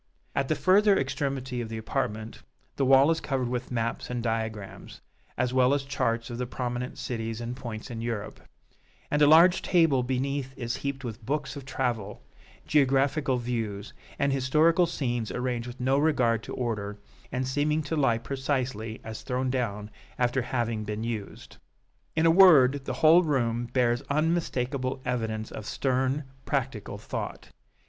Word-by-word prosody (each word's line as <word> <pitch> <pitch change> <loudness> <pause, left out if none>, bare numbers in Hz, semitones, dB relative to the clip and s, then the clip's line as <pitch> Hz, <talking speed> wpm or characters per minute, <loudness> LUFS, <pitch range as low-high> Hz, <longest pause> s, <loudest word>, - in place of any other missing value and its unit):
At 140 - 0
the 155 - +1
further 200 +3 +4
extremity 135 -2 -2
of 115 - -5
the 110 - -5
apartment, 110 -1 -3 0.3
the 135 - +1
wall 135 +3 +6
is 165 - 0
covered 130 -3 -1
with 125 +1 -3
maps 115 -2 -2
and 125 -1 -3
diagrams, 110 -3 -4 0.4
as 125 - 0
well 130 +1 +4
as 140 - -2
charts 115 -4 -1
of 120 - -5
the 125 - -2
prominent 125 0 -4
cities 115 -2 -4
and 120 +1 -4
points 120 -4 -7
in 115 -1 -5
Europe; 115 -3 -4 0.7
and 150 - +1
a 145 - +7
large 170 +4 +7
table 165 -7 +3
beneath 130 +1 -2
is 120 -2 -3
heaped 140 -1 -4
with 115 -1 -6
books 145 +3 -2
of 140 -2 -8
travel, 120 -6 -3 0.4
geographical 135 -1 +2
views, 115 -4 -3 0.2
and 140 -1 +1
historical 155 +6 +3
scenes 120 -8 -2
arranged 125 -1 -2
with 125 +1 -9
no 130 +2 +2
regard 125 -7 +2
to - - -7
order, 105 -4 -3 0.3
and 130 +1 -2
seeming 150 +3 +1
to 155 +2 -3
lie 135 -6 +3
precisely 130 -3 -3
as 110 0 -7
thrown 130 0 -1
down 105 -5 -2 0.3
after 125 +1 +1
having 120 -3 -2
been 105 +1 -4
used. 115 -4 -6 0.6
In 160 +1 +2
a 165 - +6
word, 145 -7 +6
the - - -2
whole 165 +3 +8
room 120 -7 0
bears 120 -1 +1
unmistakable 140 -4 0
evidence 110 -3 -2
of 105 - -7
stern, 130 +2 0 0.2
practical 130 -8 -3
thought. 105 - -6
125 Hz, 160 wpm, -27 LUFS, 115-140 Hz, 0.7 s, whole